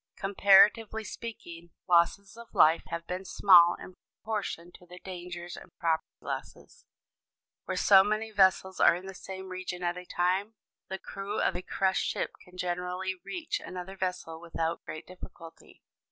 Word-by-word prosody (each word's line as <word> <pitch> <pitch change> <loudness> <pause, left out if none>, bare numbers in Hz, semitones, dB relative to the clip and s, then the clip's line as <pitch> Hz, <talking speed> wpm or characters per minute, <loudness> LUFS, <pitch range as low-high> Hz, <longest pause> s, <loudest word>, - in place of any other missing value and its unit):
Comparatively 205 +3 +4
speaking, 175 -8 -8 0.2
losses 180 +4 +2
of 235 0 -13
life 160 +2 +6
have 170 0 -5
been 180 +2 -4
small 180 -2 +6
in 185 - -11 0.3
proportion 200 -5 -4
to 180 - -17
the 180 +1 -12
dangers 175 -2 -8
and - - -12
property 165 -1 0
losses. - - -8 0.8
Where - - -3
so 195 -2 +7
many 215 +2 -1
vessels 190 -2 +3
are - - +6
in 180 +2 -8
the 195 - -7
same 190 0 -8
region 185 -1 -5
at 175 0 -1
a 180 - -11
time, 185 +5 0 0.3
the 190 - -3
crew 200 +2 -5
of - - +1
a 180 - -3
crushed 190 +1 0
ship - - -2
can 180 0 -17
generally 180 +1 -2
reach 340 -3 -4
another 185 +1 -8
vessel 180 -3 -4
without 165 -1 -3
great 155 +1 -7
difficulty. 165 -2 -13
185 Hz, 155 wpm, -29 LUFS, 175-195 Hz, 0.8 s, so